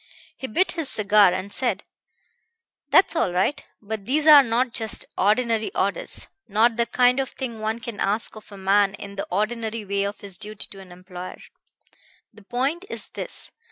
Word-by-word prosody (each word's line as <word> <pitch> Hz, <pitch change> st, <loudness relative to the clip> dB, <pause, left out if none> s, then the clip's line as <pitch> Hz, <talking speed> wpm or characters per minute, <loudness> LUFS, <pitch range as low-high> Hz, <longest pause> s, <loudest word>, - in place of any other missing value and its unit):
"He 265 Hz, -, -6 dB
bit 365 Hz, -, +1 dB
his 325 Hz, -5 st, -2 dB
cigar, 205 Hz, -2 st, +5 dB
and 185 Hz, +2 st, -4 dB
said: 255 Hz, -2 st, +1 dB, 1.1 s
'That's 380 Hz, -, +5 dB
all 320 Hz, -, +1 dB
right: 195 Hz, +11 st, 0 dB, 0.2 s
but 210 Hz, -1 st, -6 dB
these 295 Hz, +4 st, +1 dB
are 300 Hz, -2 st, +10 dB
not 240 Hz, 0 st, 0 dB
just 220 Hz, -2 st, -2 dB
ordinary 220 Hz, +2 st, +1 dB
orders; 195 Hz, +1 st, -2 dB, 0.2 s
not 225 Hz, +2 st, +3 dB
the 235 Hz, 0 st, +1 dB
kind 250 Hz, +2 st, +3 dB
of 270 Hz, -, -1 dB
thing 240 Hz, -4 st, -6 dB
one 220 Hz, +1 st, -2 dB
can 230 Hz, -2 st, -7 dB
ask 210 Hz, +4 st, 0 dB
of 215 Hz, -1 st, -13 dB
a 200 Hz, -, -10 dB
man 195 Hz, +1 st, +2 dB
in 200 Hz, +1 st, -9 dB
the 195 Hz, -, -4 dB
ordinary 225 Hz, 0 st, -2 dB
way 200 Hz, 0 st, 0 dB
of 200 Hz, +1 st, -5 dB
his 195 Hz, -3 st, -9 dB
duty 215 Hz, -1 st, -3 dB
to 195 Hz, -, -11 dB
an 190 Hz, -2 st, -13 dB
employer. 180 Hz, 0 st, -9 dB, 1.0 s
The 215 Hz, -, -16 dB
point 270 Hz, -, -1 dB
is -, -, -5 dB
this. -, -, -5 dB
215 Hz, 180 wpm, -24 LUFS, 200-245 Hz, 1.1 s, are